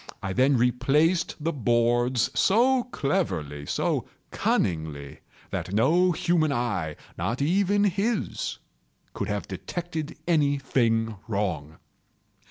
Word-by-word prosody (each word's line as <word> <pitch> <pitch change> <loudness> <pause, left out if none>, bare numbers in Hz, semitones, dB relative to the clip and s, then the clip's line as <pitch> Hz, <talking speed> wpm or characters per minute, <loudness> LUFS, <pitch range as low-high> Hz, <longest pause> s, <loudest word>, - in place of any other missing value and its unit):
I 95 -1 -2
then 130 +5 +3
replaced 135 +8 +2
the 165 +2 -1
boards 120 -1 +2
so 245 +5 +3
cleverly, 90 - -2
so - - -1 0.2
cunningly, 80 -5 -1 0.3
that 95 - -4
no 175 +11 +4
human 170 -2 +1
eye—not 105 - -3
even 195 +7 +2
his—could 205 +4 -3
have - - -3
detected 165 -3 -5
any 145 -4 +3
thing 115 -5 0
wrong. 90 -8 -2
130 Hz, 95 wpm, -26 LUFS, 105-170 Hz, 0.3 s, no